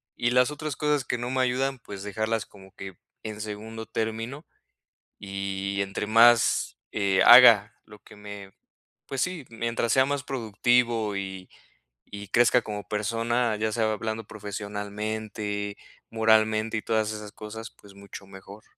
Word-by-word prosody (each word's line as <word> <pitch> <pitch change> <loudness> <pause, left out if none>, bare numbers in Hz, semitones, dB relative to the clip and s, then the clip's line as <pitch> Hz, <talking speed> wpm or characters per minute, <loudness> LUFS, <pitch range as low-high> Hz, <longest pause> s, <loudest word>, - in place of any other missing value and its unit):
y 120 - 0
las 125 +2 +4
otras 150 -1 -5
cosas 150 -3 +1
que 125 - -2
no 120 +1 -4
me 130 0 +1
ayudan, 130 +1 0
pues 100 -2 -9
dejarlas 110 +2 -2
como 95 -1 -17
que, 95 -2 -9 0.3
en 105 -1 -6
segundo 110 +2 -7
término 115 +6 -4 0.7
y 100 0 -4
entre 100 +1 -4
más 115 - +4
eh, 100 -2 +1
haga 120 -2 +8
lo 105 - -14
que - - -16
me 100 -1 -10 0.6
pues 135 - -4
sí, 180 -5 -2
mientras 115 0 -2
sea 130 0 +5
más 140 0 -2
productivo 115 -3 0
y 95 -1 -6 0.6
y 100 0 -9
crezca 120 +3 +4
como 105 -3 -7
persona, 115 +2 0
ya 110 +1 -1
sea 110 -1 +1
hablando 110 +1 -4
profesionalmente, 105 0 -5 0.3
moralmente 110 0 +2
y - - -5
todas 110 -1 0
esas 105 -1 -7
cosas, 110 +1 -8
pues 100 -1 -18
mucho 100 0 -11
mejor. 100 +3 -13
110 Hz, 145 wpm, -26 LUFS, 100-120 Hz, 0.7 s, haga